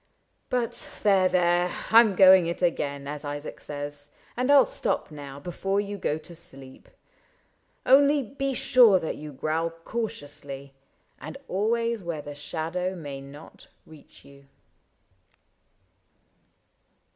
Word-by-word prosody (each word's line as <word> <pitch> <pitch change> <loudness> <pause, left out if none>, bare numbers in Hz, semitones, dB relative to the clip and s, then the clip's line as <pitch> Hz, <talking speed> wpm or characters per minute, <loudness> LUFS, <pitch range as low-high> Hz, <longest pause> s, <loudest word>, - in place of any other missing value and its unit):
— - - -46
But 240 -1 -2
there, 195 -3 +4
there, 175 0 +2 0.2
I 225 - +9
'm 220 -4 +4
going 185 -2 +7
it 170 +2 -4
again, 140 -5 -1
as 150 +1 -5
Isaac 145 +1 -6
says. 145 0 -7 0.3
And 250 +2 -1
I 285 - +7
*11 275 - +7
stop - - -2
now 140 -2 -9
before 195 +5 -2
you 205 0 -4
go 150 - -1
to 160 +2 -12
sleep. 135 -5 -12 0.5
— - - -42
Only 280 +2 +5
be 275 +3 -3
sure 235 -6 +5
that 160 - -4
you 150 0 -8
growl 155 +4 -1
cautiously, 145 -7 -6 0.5
And - - -8
always 230 +3 0
where 170 -4 -5
the 145 - -7
shadow 165 +5 -4
may 145 -5 -7
not 140 +3 -13 0.2
reach 155 -2 -17
you." 140 0 -17
170 Hz, 135 wpm, -26 LUFS, 145-205 Hz, 0.5 s, I